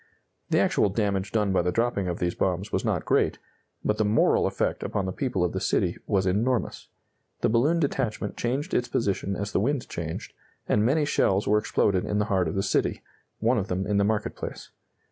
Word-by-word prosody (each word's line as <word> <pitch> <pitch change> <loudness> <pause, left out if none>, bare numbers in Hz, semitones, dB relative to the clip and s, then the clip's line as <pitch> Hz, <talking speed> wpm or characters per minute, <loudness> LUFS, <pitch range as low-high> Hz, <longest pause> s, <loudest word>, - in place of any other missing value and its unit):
The - - +2
actual 105 - +3
damage 100 -1 -1
done 105 -3 +1
by 95 - +3
the 90 +1 0
dropping 115 -2 0
of 90 -1 -2
these 85 0 -1
bombs 95 +2 -1
was - - 0
not - - -1
great, - - +2 0.5
but 105 - +1
the - - +4
moral 105 +1 +3
effect - - -1
upon 100 - -2
the 95 - -2
people 100 -4 -1
of 90 - +1
the - - -2
city - - +1
was 95 -2 +1
enormous. 115 +6 0 0.5
The - - +2
balloon 140 +10 +3
detachment 120 -8 -1
changed 135 +8 -2
its 120 - +1
position 100 -4 -1
as 100 +2 -4
the - - +1
wind 130 +5 0
changed, 80 -1 -5 0.3
and 105 - +2
many 145 +6 +2
shells 100 -8 +1
were 105 +1 +4
exploded 100 -3 +1
in 105 - -1
the 105 - +2
heart 95 -3 +2
of 80 - -3
the 95 - 0
city, - - 0 0.3
one 115 +2 +2
of 100 - -3
them 95 -1 -2
in 100 0 0
the 100 - +4
market 105 +1 -1
place. - - -7
105 Hz, 210 wpm, -26 LUFS, 95-115 Hz, 0.5 s, the